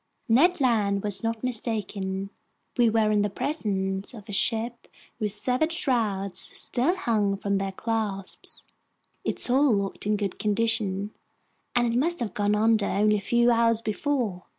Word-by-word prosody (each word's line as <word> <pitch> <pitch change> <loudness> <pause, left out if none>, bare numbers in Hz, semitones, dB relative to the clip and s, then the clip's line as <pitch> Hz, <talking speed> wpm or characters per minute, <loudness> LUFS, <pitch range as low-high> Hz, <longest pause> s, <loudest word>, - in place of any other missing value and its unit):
Ned 310 +10 +4
Land 210 -7 +2
was 205 -2 -1
not 225 0 -2
mistaken. 200 -5 -2 0.4
We 240 -2 +4
were 220 -1 +2
in 210 -1 +3
the 205 - +1
presence 195 - -2
of 215 -2 -11
a - - -7
ship 230 +3 0 0.3
whose 210 -2 0
severed 255 +9 +1
shrouds 205 - 0
still 275 +10 -1
hung 210 - 0
from 200 0 -1
their 195 0 -2
clasps. 205 -2 -3 0.6
Its - - -1
hull 260 -1 +4
looked 200 0 -3
in 210 0 +2
good 200 -2 -3
condition, 210 -2 0 0.6
and 240 -1 +2
it 240 - +2
must 340 +5 0
have 235 -4 -2
gone 205 0 +1
under 215 -1 +3
only 210 +1 +2
a - - -4
few 240 +3 +3
hours 230 -1 +3
before. 220 -4 -2
215 Hz, 155 wpm, -26 LUFS, 200-240 Hz, 0.6 s, Ned